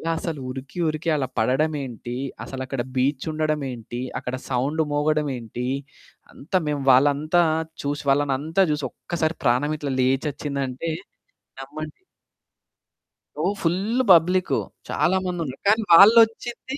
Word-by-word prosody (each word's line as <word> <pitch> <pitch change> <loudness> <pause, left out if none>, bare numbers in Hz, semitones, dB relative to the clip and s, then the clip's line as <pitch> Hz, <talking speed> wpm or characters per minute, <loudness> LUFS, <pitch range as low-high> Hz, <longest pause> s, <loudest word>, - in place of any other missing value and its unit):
అసలు 160 -2 -4
ఉరికి, 135 +5 -7
ఉరికి 155 +2 -2
అలా 135 -3 -1
పడడమేంటి, 130 -1 -1 0.3
అసలు 135 -1 -7
అక్కడ 130 -1 -3
బీచ్ 130 +1 0
ఉండడం 155 -1 -1
ఏంటి, 120 0 -7 0.2
అక్కడ 125 - -4
సౌండ్ 135 +5 0
మోగడం 150 0 +1
ఏంటి? 120 +1 -5 0.7
అంతా 165 +7 -2
మేము 145 -2 -1
వాళ్ళంతా 145 +6 +4 0.4
చూసి 145 +1 -3
వాళ్ళనంతా 145 +5 +1
చూసి 150 -2 -2
ఒక్కసారి 165 -1 -3
ప్రాణం 130 +6 +2
ఇట్లా 140 -2 -3
లేచొచ్చిందంటే 140 +2 -1 0.7
నమ్మండి. 150 - -8 1.4
ఓ - - -1 0.2
ఫుల్లు 200 +9 0
పబ్లిక్కు. 180 +2 +4 0.3
చాలా 190 +2 +2
మందున్నారు. 165 -7 -4
కానీ, 220 +2 +4
వాళ్ళొచ్చింది 225 +6 +5
150 Hz, 115 wpm, -23 LUFS, 135-165 Hz, 1.4 s, వాళ్ళొచ్చింది